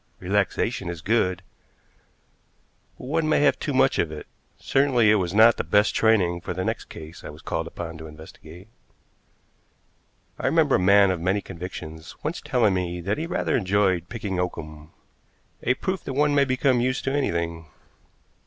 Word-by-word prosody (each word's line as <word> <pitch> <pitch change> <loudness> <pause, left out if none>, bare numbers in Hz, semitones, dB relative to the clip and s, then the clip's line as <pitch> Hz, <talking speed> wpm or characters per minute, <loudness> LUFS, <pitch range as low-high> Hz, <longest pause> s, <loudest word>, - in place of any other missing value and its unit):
Relaxation 100 +1 -1
is 85 -1 -5
good, 95 -1 0 1.5
but - - -10
one 155 +3 0
may - - +3
have 145 - +3
too 145 - -3
much 135 0 +2
of 80 - 0
it; 75 - -8 0.3
certainly 130 -6 +3
it 110 - +4
was 85 -2 -2
not 110 +3 +6
the - - -1
best 105 +1 +2
training 95 -6 +2
for - - -5
the 95 +1 -2
next - - -3
case 80 +2 -11
I - - -7
was - - -12
called - - -3
upon 80 -2 -7
to 80 - -8
investigate. 80 +4 -13 1.7
I - - -1
remember - - +3
a - - -2
man 100 +1 +5
of 90 -3 -3
many 95 +4 +1
convictions 85 -4 -8
once 160 +4 -3
telling 125 -9 +2
me 90 -1 -2
that 100 - -2
he 165 - -3
rather - - -1
enjoyed 95 -4 +1
picking 100 -6 -4
oakum, 75 -4 -5 0.7
a 125 - +1
proof 190 +6 -3
that 135 - -4
one 145 +2 +2
may 140 -1 +4
become 130 -1 +1
used 130 +1 -1
to 135 - -1
anything. 85 - -2
100 Hz, 170 wpm, -24 LUFS, 85-125 Hz, 1.7 s, not